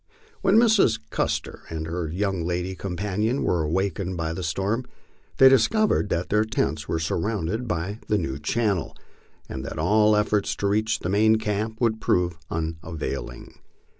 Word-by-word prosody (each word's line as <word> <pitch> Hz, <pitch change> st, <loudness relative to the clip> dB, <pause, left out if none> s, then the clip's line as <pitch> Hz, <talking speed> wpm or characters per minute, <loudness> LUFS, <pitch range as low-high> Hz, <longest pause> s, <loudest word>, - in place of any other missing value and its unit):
When 195 Hz, +3 st, +4 dB
Mrs. 220 Hz, -, +5 dB
Custer -, -, -2 dB
and 80 Hz, -1 st, -4 dB
her 85 Hz, +1 st, -3 dB
young 95 Hz, +1 st, -1 dB
lady 90 Hz, +2 st, -2 dB
companion 100 Hz, +6 st, -2 dB
were 85 Hz, -, +1 dB
awakened 95 Hz, +3 st, -1 dB
by 80 Hz, -1 st, -2 dB
the 95 Hz, -, -5 dB
storm, 100 Hz, +9 st, -1 dB, 0.5 s
they 135 Hz, -, +8 dB
discovered 205 Hz, -, +3 dB
that 85 Hz, +2 st, -1 dB
their 105 Hz, +1 st, +3 dB
tents 75 Hz, -9 st, -2 dB
were 80 Hz, -, -1 dB
surrounded 100 Hz, +6 st, -2 dB
by 100 Hz, +2 st, -3 dB
the 105 Hz, -, +2 dB
new 70 Hz, -7 st, -3 dB
channel, 105 Hz, -1 st, -1 dB, 0.5 s
and -, -, -6 dB
that -, -, -6 dB
all 105 Hz, +6 st, +4 dB
efforts 105 Hz, -1 st, +1 dB
to 100 Hz, -, -1 dB
reach 110 Hz, +2 st, +1 dB
the 90 Hz, -, -2 dB
main 110 Hz, +3 st, +4 dB
camp 110 Hz, 0 st, -2 dB
would 110 Hz, -2 st, +1 dB
prove 90 Hz, -1 st, +1 dB
unavailing. 80 Hz, -4 st, -5 dB
100 Hz, 155 wpm, -25 LUFS, 85-110 Hz, 0.5 s, they